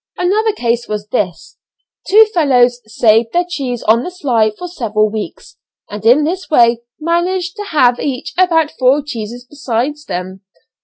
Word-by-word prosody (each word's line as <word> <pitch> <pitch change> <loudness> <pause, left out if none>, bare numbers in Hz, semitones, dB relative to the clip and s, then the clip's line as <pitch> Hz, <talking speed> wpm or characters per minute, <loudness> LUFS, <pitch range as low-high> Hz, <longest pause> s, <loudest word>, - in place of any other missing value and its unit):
Another 425 +5 +1
case 240 - -2
was 210 -1 -4
this 190 -8 -3 0.5
two 435 +3 +7
fellows 250 -7 +3
saved 225 +1 +2
their 350 +1 +2
cheese 265 -9 -4
on 225 +2 +3
the 360 - -5
sly 250 - +1
for 285 +12 -8
several 215 - -1
weeks, 215 -1 -7 0.3
and 210 0 -7
in 245 +7 +5
this 360 +5 -3
way 235 -5 +4 0.2
managed 345 +3 -1
to 415 - -5
have 250 -9 +2
each 265 -3 -4
about 330 -4 +2
four 265 +3 +3
cheeses 240 -3 -7
beside 255 -1 -2
them. 185 +1 -5
250 Hz, 155 wpm, -15 LUFS, 225-340 Hz, 0.5 s, two